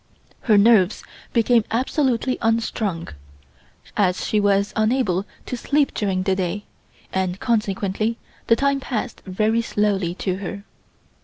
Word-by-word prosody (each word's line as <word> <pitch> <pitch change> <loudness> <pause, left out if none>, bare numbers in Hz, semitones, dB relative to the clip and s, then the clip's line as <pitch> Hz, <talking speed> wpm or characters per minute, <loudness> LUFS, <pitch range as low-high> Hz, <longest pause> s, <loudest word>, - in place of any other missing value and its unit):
Her 215 -3 +4
nerves 205 -2 +4 0.3
became 230 0 +3
absolutely 255 0 0
unstrung, 225 -6 -1 0.9
as 185 -3 +1
she 215 - +1
was 200 0 +2
unable 215 -4 +1 0.2
to - - -4
sleep 285 +4 +1
during 190 -3 -1
the 190 0 +1
day, 190 +2 -2 0.5
and 190 0 -1
consequently 215 0 0 0.3
the 230 - +5
time 280 +2 +1
passed 245 -2 -4
very 215 +5 +1
slowly 200 -6 0
to 185 -1 -2
her. 200 +1 -6
210 Hz, 125 wpm, -22 LUFS, 190-230 Hz, 0.9 s, the